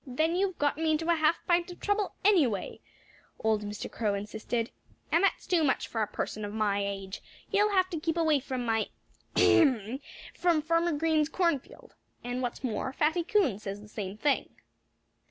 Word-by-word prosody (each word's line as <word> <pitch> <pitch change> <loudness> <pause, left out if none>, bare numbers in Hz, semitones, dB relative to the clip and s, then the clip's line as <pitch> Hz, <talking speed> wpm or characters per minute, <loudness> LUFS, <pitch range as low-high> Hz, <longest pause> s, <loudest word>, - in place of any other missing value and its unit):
"Then 315 +7 +1
you've 375 -1 0
got 290 0 +1
me 320 0 +1
into 320 +2 +1
a - - +4
half 315 +1 +1
pint 345 0 +2
of 355 - -9
trouble, 410 -1 0
anyway," 290 - +2 0.6
old 220 -1 +1
Mr. 205 0 -5
Crow 210 -3 -1
insisted. 220 +4 -3 0.4
"And 340 - +4
that's 395 - +1
too 350 -3 +2
much, 270 - +1
for 225 - -2
a 215 - +1
person 215 - -4
of 205 - -4
my 205 -2 0
age. 195 -1 -5 0.3
You'll 415 +1 +3
have 370 -1 +4
to 330 - -2
keep 325 +2 -1
away 315 -3 +3
from 255 -2 -4
my 225 -2 +1 0.5
ahem! 255 -5 +4 0.3
from 335 -4 +2
Farmer 335 +1 +2
Green's 310 0 +2
cornfield. 335 -6 -2 0.3
And 245 +1 -3
what's 245 +2 -4
more, 255 +1 -2
Fatty 315 +5 +1
Coon 330 - +2
says 200 -1 -5
the 210 - -13
same 205 -2 -6
thing." 285 +4 +1
290 Hz, 180 wpm, -29 LUFS, 220-335 Hz, 0.6 s, a